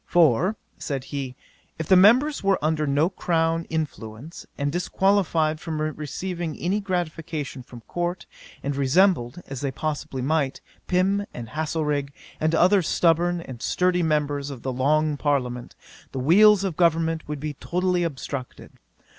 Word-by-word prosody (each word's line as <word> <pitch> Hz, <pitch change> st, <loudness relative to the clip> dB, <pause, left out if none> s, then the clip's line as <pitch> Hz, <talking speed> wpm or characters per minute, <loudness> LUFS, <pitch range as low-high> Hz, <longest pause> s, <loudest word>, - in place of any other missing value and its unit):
"For, 175 Hz, -, +3 dB, 0.2 s
(said 135 Hz, -3 st, -3 dB
he,) 135 Hz, -2 st, -5 dB, 0.4 s
if 160 Hz, -, -4 dB
the 190 Hz, -, +6 dB
members 245 Hz, +11 st, +5 dB
were 195 Hz, -1 st, +3 dB
under 155 Hz, 0 st, 0 dB
no 145 Hz, +4 st, +3 dB
crown 165 Hz, -3 st, 0 dB
influence, 150 Hz, -3 st, -5 dB
and 140 Hz, 0 st, -1 dB
disqualified 175 Hz, -3 st, +1 dB
from 160 Hz, -2 st, -4 dB
receiving 155 Hz, +2 st, -4 dB
any 190 Hz, +4 st, 0 dB
gratification 165 Hz, -7 st, -3 dB
from 120 Hz, -1 st, -12 dB
Court, 175 Hz, +5 st, -3 dB, 0.4 s
and 140 Hz, 0 st, -2 dB
resembled, 145 Hz, +1 st, +2 dB
as 135 Hz, -2 st, -7 dB
they 140 Hz, -, -1 dB
possibly 140 Hz, -2 st, -4 dB
might, 140 Hz, -1 st, 0 dB, 0.3 s
Pym 195 Hz, +3 st, +1 dB
and 115 Hz, -2 st, -7 dB
Haslerig, 150 Hz, -1 st, -1 dB, 0.3 s
and 160 Hz, +1 st, +1 dB
other 185 Hz, +4 st, +5 dB
stubborn 170 Hz, +1 st, +2 dB
and 130 Hz, -7 st, -9 dB
sturdy 180 Hz, +3 st, +1 dB
members 145 Hz, -3 st, 0 dB
of 135 Hz, -4 st, -8 dB
the 130 Hz, -, -2 dB
long 150 Hz, +3 st, +1 dB
Parliament, 125 Hz, -5 st, -1 dB, 0.4 s
the -, -, -4 dB
wheels 200 Hz, +8 st, +6 dB
of 190 Hz, -5 st, -2 dB
government 165 Hz, -1 st, +1 dB
would 150 Hz, -1 st, -4 dB
be 150 Hz, +1 st, -4 dB
totally 180 Hz, +4 st, -1 dB
obstructed. 140 Hz, -5 st, -5 dB
160 Hz, 145 wpm, -24 LUFS, 140-175 Hz, 0.4 s, the